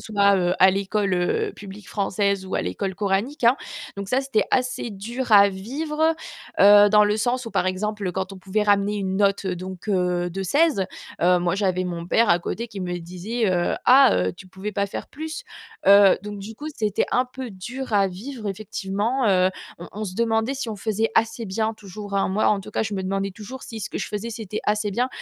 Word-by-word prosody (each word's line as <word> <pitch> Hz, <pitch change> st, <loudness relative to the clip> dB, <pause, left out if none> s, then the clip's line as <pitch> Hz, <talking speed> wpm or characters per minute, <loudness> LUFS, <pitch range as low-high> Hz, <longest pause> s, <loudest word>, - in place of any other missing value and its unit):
soit, 200 Hz, -2 st, +3 dB
heu, 180 Hz, 0 st, +1 dB
à 190 Hz, -, +8 dB
l'école, 195 Hz, +1 st, -1 dB
heu, 405 Hz, -, 0 dB
publique 200 Hz, -1 st, -11 dB
française 200 Hz, -1 st, 0 dB
ou -, -, -5 dB
à -, -, 0 dB
l'école 185 Hz, -, -3 dB
coranique, 205 Hz, +8 st, -1 dB
hein. 240 Hz, +4 st, +6 dB, 0.4 s
Donc 200 Hz, -, -5 dB
ça 260 Hz, +5 st, +1 dB
c'était 250 Hz, -6 st, +1 dB
assez 255 Hz, -1 st, 0 dB
dur 230 Hz, +5 st, -5 dB
à 200 Hz, -1 st, +8 dB
vivre, 300 Hz, +11 st, -1 dB, 0.4 s
heu, 205 Hz, +1 st, +8 dB
dans 210 Hz, 0 st, +6 dB
le 210 Hz, +1 st, +1 dB
sens 250 Hz, +3 st, 0 dB
où, 230 Hz, -, -7 dB
par 195 Hz, -2 st, 0 dB
exemple, 200 Hz, 0 st, -2 dB
quand 190 Hz, 0 st, -3 dB
on 195 Hz, -, -9 dB
pouvait 195 Hz, +3 st, -1 dB
ramener 205 Hz, 0 st, +2 dB
une 190 Hz, -1 st, -2 dB
note 200 Hz, -1 st, +2 dB
donc, 185 Hz, +2 st, -5 dB
heu, 180 Hz, -2 st, 0 dB
de 195 Hz, +2 st, -4 dB
16, 285 Hz, -, +2 dB, 0.4 s
heu, 180 Hz, +1 st, +5 dB
moi 175 Hz, +1 st, 0 dB
j'avais 185 Hz, -2 st, 0 dB
mon 170 Hz, -1 st, -4 dB
père 230 Hz, +2 st, +3 dB
à 170 Hz, -, +5 dB
côté 230 Hz, +6 st, -4 dB
qui 200 Hz, -3 st, -8 dB
me 180 Hz, -1 st, -3 dB
disait: 185 Hz, +8 st, -4 dB, 0.4 s
«Ah! 265 Hz, +2 st, +7 dB
Heu, 90 Hz, 0 st, +1 dB
tu 185 Hz, -, -14 dB
pouvais 190 Hz, +3 st, -6 dB
pas 200 Hz, 0 st, 0 dB
faire -, -, -6 dB
plus?» 315 Hz, -, -6 dB, 0.4 s
heu, 200 Hz, -1 st, +7 dB
donc 210 Hz, 0 st, -6 dB
du 210 Hz, +3 st, -8 dB
coup 295 Hz, +6 st, -8 dB
c'était 210 Hz, -2 st, 0 dB
un 250 Hz, -, +2 dB
peu 255 Hz, -1 st, -7 dB
dur 235 Hz, +8 st, -7 dB
à 200 Hz, -1 st, +4 dB
vivre 215 Hz, +4 st, -6 dB
effectivement. 210 Hz, +5 st, -2 dB
Heu, 185 Hz, -1 st, +4 dB, 0.3 s
on 170 Hz, -, -9 dB
on 215 Hz, +1 st, -4 dB
se 185 Hz, -, -6 dB
demandait 225 Hz, +3 st, +1 dB
si 265 Hz, -3 st, -4 dB
on 215 Hz, -, -4 dB
faisait 220 Hz, +2 st, -1 dB
assez 225 Hz, +1 st, +1 dB
bien 220 Hz, +3 st, -1 dB
toujours, 205 Hz, 0 st, -9 dB
hein. 195 Hz, -, +1 dB
Moi, 205 Hz, +3 st, +1 dB
en 205 Hz, -2 st, +3 dB
tout 210 Hz, -, -10 dB
cas, -, -, -1 dB
je 210 Hz, -1 st, -3 dB
me 190 Hz, -, -2 dB
demandais 195 Hz, +1 st, -2 dB
toujours 230 Hz, +6 st, -9 dB
si 225 Hz, -2 st, -8 dB
ce -, -, -5 dB
que -, -, -4 dB
je -, -, -3 dB
faisais, 210 Hz, +3 st, -4 dB
c'était 215 Hz, -2 st, -5 dB
assez 210 Hz, 0 st, 0 dB
bien. 245 Hz, +6 st, 0 dB
205 Hz, 220 wpm, -23 LUFS, 190-225 Hz, 0.4 s, à